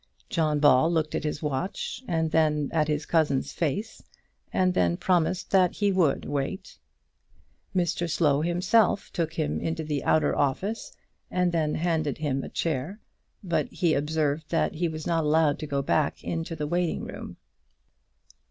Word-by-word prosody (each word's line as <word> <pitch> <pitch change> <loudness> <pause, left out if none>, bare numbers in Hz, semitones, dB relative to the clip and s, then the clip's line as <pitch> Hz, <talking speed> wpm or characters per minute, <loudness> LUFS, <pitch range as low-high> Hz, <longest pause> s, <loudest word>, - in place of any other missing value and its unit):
John 155 -3 +1
Ball 145 +2 +5
looked 155 -2 0
at - - -2
his 150 0 -3
watch, 185 - -3
and 160 -2 0
then 150 -2 +2
at 155 -2 +2
his 150 -1 -1
cousin's 150 -5 +1
face, 200 +8 -2 0.5
and 185 -1 +2
then 85 - +2
promised 180 0 0
that 185 -2 +4
he 205 -1 +1
would 180 -7 +2
wait. 145 +7 -4 1.0
Mr 175 -1 0
Slow 150 -3 +2
himself 180 +5 +2
took 165 -3 -1
him 160 -3 -1
into 160 0 -2
the 150 -2 -2
outer 155 - +2
office, 190 +11 -1 0.4
and 180 -1 +1
then 155 -3 0
handed 160 -3 0
him 140 -3 -1
a - - -6
chair; 165 - -2 0.4
but 175 -3 0
he 170 -4 0
observed 150 +1 -1
that 165 - +1
he 170 +2 -1
was 155 -1 -5
not 165 -2 +1
allowed 150 -1 +3
to 155 - -5
go 140 -1 -1
back 150 +1 0
into 165 0 -3
the 150 -1 -3
waiting 175 +2 -1
room. - - -8
160 Hz, 160 wpm, -27 LUFS, 150-175 Hz, 1.0 s, Ball